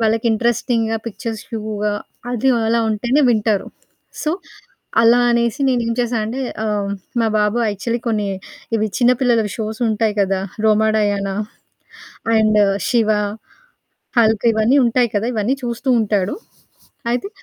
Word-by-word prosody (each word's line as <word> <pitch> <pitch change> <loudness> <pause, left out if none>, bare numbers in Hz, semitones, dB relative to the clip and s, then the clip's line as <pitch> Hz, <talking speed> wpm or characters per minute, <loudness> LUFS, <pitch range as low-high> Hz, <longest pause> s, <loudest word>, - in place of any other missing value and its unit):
వాళ్ళకి 225 +1 +1
ఇంట్రెస్టింగ్‌గా 230 0 0
పిక్చర్స్ 225 +1 -5
వ్యూగా 210 -2 -2 0.4
అది 245 +2 0 0.2
అలా 230 +1 +2
ఉంటేనే 240 +7 +1
వింటారు. 215 -3 +1 0.6
సో, 305 - 0 0.7
అలా 230 +1 +6
అనేసి 235 +3 +1
నేనేం 235 -2 +1
చేశా 240 0 -1
అంటే, 235 +5 -4 0.3
ఆహ్, 205 -2 -1 0.3
మా 225 - +2
బాబు 210 +2 +1
యాక్చువల్లీ 230 +4 -3
కొన్ని 210 -3 0 0.5
ఇవి 215 -1 +1
చిన్నపిల్లలవి 245 -3 +3
షోసుంటాయి 220 -1 -1
కదా! 195 -1 +1 0.2
'Roma 220 0 +4
Diana' 200 -1 0 1.0
and 215 -1 +3 0.3
'Shiva', 225 -3 +3 1.1
'Hulk' 220 -1 +3
ఇవన్నీ 220 +5 +3
ఉంటాయి 240 +1 +2
కదా! 205 +3 0
ఇవన్నీ 220 +5 +1
చూస్తూ 240 +3 -4
ఉంటాడు. 205 -3 0 0.8
అయితే 250 +11 -2
225 Hz, 120 wpm, -19 LUFS, 210-235 Hz, 1.1 s, అలా